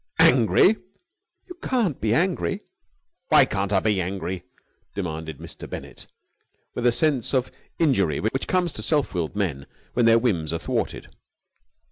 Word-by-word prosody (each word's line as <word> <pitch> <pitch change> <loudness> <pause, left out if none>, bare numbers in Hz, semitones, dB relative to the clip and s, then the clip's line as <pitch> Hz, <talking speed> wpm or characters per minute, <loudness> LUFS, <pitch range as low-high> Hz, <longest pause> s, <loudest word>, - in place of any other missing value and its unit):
"Angry!" 130 - +5 0.7
"You 360 - -9
can't 225 - 0
be 110 - +1
angry!" 160 - +1 0.7
"Why - - +7
can't 95 0 -2
I 95 - +4
be 105 -2 +1
angry!" 95 0 -4 0.5
demanded 80 -5 -4
Mr. - - -10
Bennett, - - -8 0.7
with - - -3
that 120 - +5
sense 140 -3 +1
of 130 -1 0 0.3
injury 100 - +2
which 115 +6 -2
comes 180 -2 +1
to 110 - -8
self 145 - 0
willed 85 0 -2
men 80 -10 -2 0.3
when 120 -1 +3
their 115 0 +6
whims 90 -10 0
are - - 0
thwarted. 80 - -3
110 Hz, 145 wpm, -24 LUFS, 90-135 Hz, 0.7 s, Why